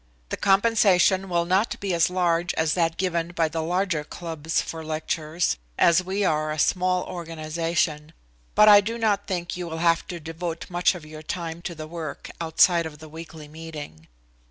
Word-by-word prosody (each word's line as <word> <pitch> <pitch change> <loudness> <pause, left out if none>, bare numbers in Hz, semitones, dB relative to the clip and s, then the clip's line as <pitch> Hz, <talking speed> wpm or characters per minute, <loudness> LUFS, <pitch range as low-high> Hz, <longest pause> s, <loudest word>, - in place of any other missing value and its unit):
The - - -2
compensation 195 -2 +3
will 170 -1 +1
not 190 +6 +1
be 195 -2 -2
as 170 0 +3
large 175 -1 +1
as 160 -1 +1
that 165 -2 0
given 175 -2 -1
by 165 -1 +2
the 160 +1 -3
larger 175 -1 0
clubs 160 0 -3
for 160 -1 -5
lectures, 155 - -1 0.2
as 170 +1 +4
we 195 +2 -1
are 155 -2 +1
a 155 - -3
small 180 +3 +2
organization, 165 -2 -2 0.4
but 210 - +7
I 205 -1 +9
do 225 +3 -4
not 210 -3 0
think 175 -3 -3
you 175 -1 -5
will 160 -1 -5
have 165 0 +2
to 175 - -6
devote 165 +2 -6
much 175 +2 +2
of 170 -3 -9
your 155 0 -10
time 165 +1 -5
to 170 0 -5
the 155 -1 -7
work 160 -2 -7
outside 165 +1 +3
of 150 -1 -11
the 155 0 -12
weekly 160 -1 -10
meeting. 150 - -9
170 Hz, 180 wpm, -25 LUFS, 160-180 Hz, 0.4 s, I